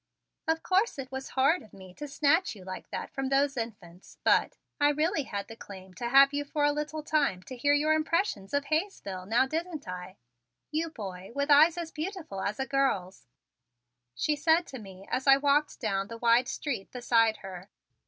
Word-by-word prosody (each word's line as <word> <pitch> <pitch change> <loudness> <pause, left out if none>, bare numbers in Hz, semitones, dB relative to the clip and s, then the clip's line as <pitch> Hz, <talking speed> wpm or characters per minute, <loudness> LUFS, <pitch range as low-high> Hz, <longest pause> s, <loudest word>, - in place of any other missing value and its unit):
"Of 320 0 0
course, 385 +2 +2
it 265 -1 -6
was 265 0 -5
horrid 280 +7 +4
of 215 - -17
me 190 -2 -12
to 295 - -7
snatch 290 +2 +2
you 195 - -12
like 185 0 -8
that - - -5
from 270 -1 -3
those 275 +1 +2
infants, 205 -7 -7
but - - +3 0.2
I 290 0 +5
really 305 +1 0
had 200 -4 -4
the 225 - -9
claim 190 -4 -11
to 235 +6 -4
have 275 +2 +7
you 290 0 -1
for 290 +1 -2
a 290 - +4
little 300 +1 -4
time 280 -13 +1
to 255 - -8
hear 285 +4 +3
your 305 +2 +3
impressions 315 - 0
of 285 0 0
Hayesville, 295 - -2
now, 235 +5 +3
didn't 320 - -4
I? 180 +1 -7 0.5
you 320 +2 -1
boy 190 - -8
with 280 +1 0
eyes 315 +4 +7
as 335 -2 -4
beautiful 315 - -5
as 205 +4 -2
a 265 - 0
girl's!" 265 -10 -1 0.9
she 300 - +1
said 320 +4 +3
to 265 - -7
me 195 -2 -12
as 260 +2 -1
I 270 0 +8
walked 290 +1 +1
down 195 -4 -1
the 230 - -8
wide 235 +2 +4
street 270 -8 -4
beside 230 -3 +2
her. 185 0 -9
275 Hz, 195 wpm, -29 LUFS, 205-305 Hz, 0.9 s, I